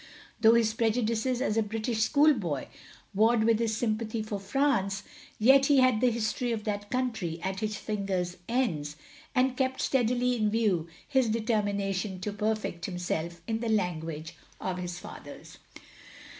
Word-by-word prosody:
Though 225 0 +6
his 225 -2 +3
prejudices 230 +2 0
as 220 -5 0
a - - +4
British 220 +2 -2
schoolboy 225 - +2 0.4
warred 220 +3 +4
with 225 -1 +3
his 225 -2 0
sympathy 220 -1 -1
for 210 -2 -4
France, 200 -4 0 0.3
yet 270 +5 +6
he 285 - +5
had 255 -4 +4
the 250 - +5
history 235 +1 -1
of 220 -2 -2
that 205 -1 -3
country 225 -10 -2
at 190 0 -2
his 215 -1 -2
fingers' 190 -4 -2
ends, 165 - 0 0.4
and 255 0 +3
kept 260 0 -1
steadily 250 -1 +1
in 215 -3 +1
view 205 -7 +1 0.2
his 265 -5 +2
determination 205 -4 -1
to 205 +2 -3
perfect 210 -5 -2
himself 170 -2 -3
in 225 +2 -2
the 230 -1 -2
language 165 -6 -2 0.3
of 185 -1 -3
his 175 -1 -4
fathers. - - -11
215 Hz, 150 wpm, -29 LUFS, 195-240 Hz, 0.4 s, Though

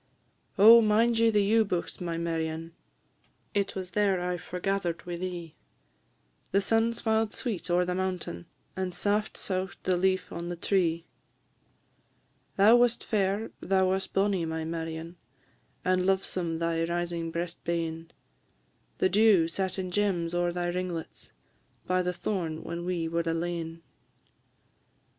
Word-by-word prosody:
Oh, 225 +4 +9
mind 225 +2 +3
ye 230 0 +5
the 210 -2 +3
ewe 220 +3 +4
bughts, 180 -4 -3
my 170 -2 -2
Marion? 165 0 -3 0.8
It 200 -1 0
was 185 -1 -5
ther 200 -3 +2
I 180 0 -1
forgather'd 180 0 -3
wi' 175 -1 -4
thee; 175 -2 -5 1.0
The 200 - +4
sun 225 +3 +2
smiled 220 -1 0
sweet 190 -9 -3
ower 175 +1 +3
the 180 - -1
mountain, 180 - -3 0.3
And 185 -2 -3
saft 205 +3 0
sough'd 190 0 -3
the 185 - +2
leaf 185 +1 +1
on 170 +1 -5
the 175 - -3
tree. 170 -2 0 1.5
Thou 215 +4 +7
wast 240 -1 +2
fair, 205 +1 0
thou 190 -1 +2
wast 190 0 -2
bonnie, 195 -2 +1
my 160 0 -3
Marion, 165 +1 -5 0.7
And 185 0 +2
lovesome 185 -3 0
thy 165 0 0
rising 170 -1 -2
breast 170 +1 -4
bane; 165 -1 -3 0.9
The - - +3
dew 195 -3 +5
sat 185 +2 -2
in 185 -1 -3
gems 180 -4 0
ower 175 0 +1
thy 175 0 -2
ringlets, 175 -2 -5 0.5
By 185 0 +1
the 180 0 0
thorn 175 -3 -3
when 170 +1 -5
we 175 -2 -1
were 165 +1 0
alane. 165 0 -3
180 Hz, 140 wpm, -28 LUFS, 170-195 Hz, 1.5 s, Oh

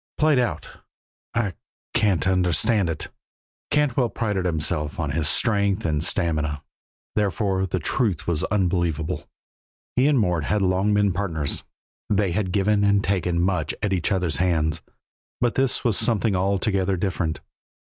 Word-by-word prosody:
"Played 150 -3 +4
out! 120 - -1 0.7
I 105 -5 0 0.4
can't 95 -4 +2
understand 95 +2 +2
it." 80 -2 -4 0.6
Cantwell 135 -5 +2
prided 105 -4 -2
himself 75 -2 -1
on 75 -4 -1
his 80 +1 +1
strength 100 -3 +1
and 75 -2 0
stamina, 80 -5 0 0.5
therefore 95 -2 0
the - - -1
truth 95 - -1
was 85 -3 0
unbelievable. 85 -4 -1 0.7
He 125 +3 +4
and 150 -2 +3
Mort 90 -7 +1
had 105 +3 +1
long 95 +3 +2
been 100 -2 +2
partners, 80 -7 -2 0.5
they 100 -3 +2
had 95 +1 -1
given 100 +2 +2
and 100 0 +3
taken 90 -3 0
much 90 -4 0
at 100 -2 +1
each 90 +2 0
other's 90 -7 0
hands, 80 -3 +1 0.6
but 120 -1 +1
this 135 -1 0
was 115 -4 +2
something 110 -3 +1
altogether 95 0 +1
different. 90 -4 -2
95 Hz, 140 wpm, -24 LUFS, 85-105 Hz, 0.7 s, Played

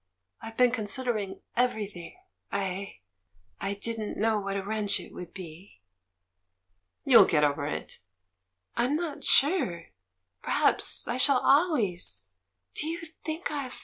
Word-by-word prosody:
I've 225 0 -9
been 250 -1 +5
considering 215 -3 -2
everything 210 - -2 0.2
— - - -45
I 195 - -4 0.3
— 90 -1 -36
I 200 +1 -2
didn't 220 +1 -4
know 220 0 +1
what 195 0 -3
a 195 - -3
wrench 210 -1 -1
it - - -12
would 175 -1 -9
be." 175 - -12 1.3
"You'll 260 -4 +8
get 150 -2 +2
over 145 0 +1
it." 150 - -5 0.8
"I'm 250 +5 +1
not 320 -3 -4
sure? 270 - +3 0.5
Perhaps - - +3
I 240 - -2
shall 265 +1 +4
always 200 - +2 0.2
—? 90 -1 -54
Do 305 - -2
you 335 +1 -4 0.2
think 320 +2 -4
I've... 275 -4 -5
210 Hz, 140 wpm, -28 LUFS, 175-255 Hz, 1.3 s, You'll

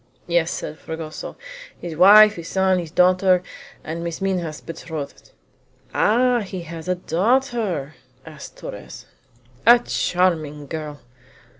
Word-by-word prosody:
"Yes," 170 -1 +1
said 155 - -6
Fragoso; 160 -1 -7 0.4
"his 170 -2 -6
wife, 210 +5 +8
his 170 -3 -8
son, 190 -1 +2
his 170 -2 -6
daughter, 180 +1 +3 0.4
and 165 +2 -5
Miss 170 -1 -4
Minha's 180 -5 -2
betrothed." 160 -3 -8 0.6
"Ah! 245 +3 +3
he 190 -4 -6
has 165 0 -9
a 180 - +1
daughter?" 200 - 0 0.3
said 155 -3 -11
Torres. - - -9 0.6
"A 240 +2 +8
charming 165 -9 -1
girl!" 150 -2 -7
175 Hz, 120 wpm, -22 LUFS, 160-190 Hz, 0.6 s, wife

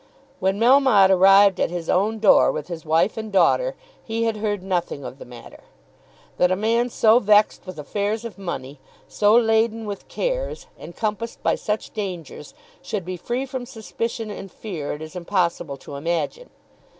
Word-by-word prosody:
When 190 +2 0
Melmotte 240 -6 +5
arrived 195 +1 +6
at - - +1
his 170 -1 -5
own 210 +4 +1
door 215 -2 +5
with 155 +2 -6
his 170 -2 -6
wife 165 +7 +1
and 220 -1 -5
daughter - - +2 0.3
he 225 0 -2
had 225 -1 0
heard 205 -3 -2
nothing 175 -7 -2
of 135 - -9
the - - -10
matter. 120 -1 -13 0.7
That 180 0 +3
a - - +3
man 230 +4 +1
so 225 0 +4
vexed 210 -3 +3
with 185 - -8
affairs 205 +8 -3
of 220 -3 -8
money, 150 -7 -6 0.3
so 210 +1 +3
laden 225 -1 +2
with 205 -1 -7
cares, - - -3
encompassed 215 +5 -5
by - - +2
such 210 0 -3
dangers, 185 -7 -6 0.3
should 195 -5 -4
be 185 0 -4
free 240 +9 -3
from 260 -2 -6
suspicion 225 -2 -5
and 195 -2 -8
fear 175 -10 -5
it 150 - -7
is 155 +3 -10
impossible 170 -5 -1
to 140 - -10
imagine. 170 - -3
205 Hz, 170 wpm, -22 LUFS, 175-225 Hz, 0.7 s, arrived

